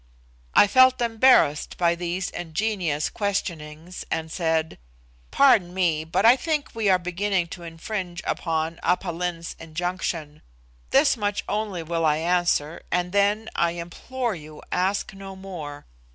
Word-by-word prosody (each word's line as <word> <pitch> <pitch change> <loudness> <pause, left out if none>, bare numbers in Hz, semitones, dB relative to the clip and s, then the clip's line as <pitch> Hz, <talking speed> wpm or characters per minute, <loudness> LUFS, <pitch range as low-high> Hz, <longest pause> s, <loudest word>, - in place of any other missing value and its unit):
I - - +8
felt 255 +4 +5
embarrassed 230 - +3
by 170 -1 +3
these 175 +1 -3
ingenious 175 -3 -1
questionings, 170 -5 -4
and 160 0 -3
said, 160 - -1 0.5
"Pardon 215 -10 +4
me, 165 -4 +1
but 180 +6 0
I 235 +2 +8
think 300 +1 -2
we 220 -3 0
are 185 - +5
beginning 180 0 -1
to 175 - -8
infringe 175 +2 -5
upon 160 0 -2
Aph 180 +2 +1
Lin's 170 -1 -3
injunction. 165 -2 -4 0.5
This 275 +1 +4
much 205 -3 -2
only 205 -5 -2
will 165 +1 -2
I 155 -1 +3
answer, 170 -2 +1
and 180 0 0
then, 205 +2 +2
I 170 0 +1
implore 225 +8 -4
you, 155 -3 -11
ask 190 +3 0
no 195 0 -9
more. 160 -7 -8
180 Hz, 140 wpm, -24 LUFS, 165-205 Hz, 0.5 s, I